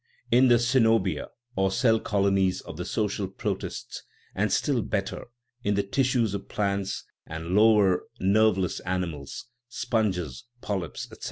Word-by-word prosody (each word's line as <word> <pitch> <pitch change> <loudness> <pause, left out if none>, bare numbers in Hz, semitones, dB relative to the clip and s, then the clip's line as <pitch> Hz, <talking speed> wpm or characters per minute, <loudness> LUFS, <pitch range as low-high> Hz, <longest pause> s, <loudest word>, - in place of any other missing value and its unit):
In 125 +2 +6
the 120 - +6
ccenobia 115 - +2 0.3
or 95 0 +2
cell 110 +3 +3
colonies 100 -3 +1
of - - -9
the - - -5
social 105 -2 -1
protists, 95 - -5 0.3
and 100 +1 0
still 130 +3 +1
better 100 -2 -3 0.4
in 100 0 +1
the 100 - +1
tissues 120 +1 +1
of 100 - -5
plants 100 -2 -1 0.2
and 80 +1 -6
lower, 105 -4 +5
nerveless 100 -2 +2
animals 90 -6 -4 0.2
(sponges, 105 - -1
polyps, 100 -6 -4
etc.) - - -12
100 Hz, 135 wpm, -27 LUFS, 95-110 Hz, 0.4 s, In